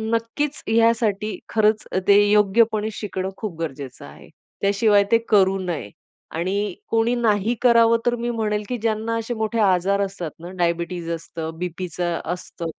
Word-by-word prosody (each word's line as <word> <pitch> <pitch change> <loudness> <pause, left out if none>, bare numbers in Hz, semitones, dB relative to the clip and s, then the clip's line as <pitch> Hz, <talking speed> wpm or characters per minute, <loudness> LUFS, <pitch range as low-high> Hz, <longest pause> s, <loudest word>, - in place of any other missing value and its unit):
नक्कीच 270 +6 -2
यासाठी 220 -2 +2
खरंच 215 0 +2 0.2
ते 205 0 +7
योग्यपणे 215 +1 +3
शिकणं 190 -3 -4
खूप 185 -7 -6
गरजेचं 140 -5 -6
आहे. - - -14 0.3
त्याशिवाय 200 +1 +4
ते 230 - +7
करू 195 -2 +4
नये. 175 - -4 0.5
आणि 190 +3 -1 0.2
कोणी 230 +1 +2
नाही 220 -2 +1
करावं 230 -2 +5
तर 240 0 +2
मी 240 +1 -2
म्हणेल 215 -3 -1
की 250 - -1
ज्यांना 225 0 -1
असे 230 +1 -3
मोठे 220 +1 -2
आजार 195 +1 +2
असतात 190 -5 -4
ना, 170 +2 -8
डायबिटीज 170 0 -1
असतं, 165 -1 -5
बीपीच 180 0 -5
असतं 175 0 -3
205 Hz, 145 wpm, -22 LUFS, 180-225 Hz, 0.5 s, ते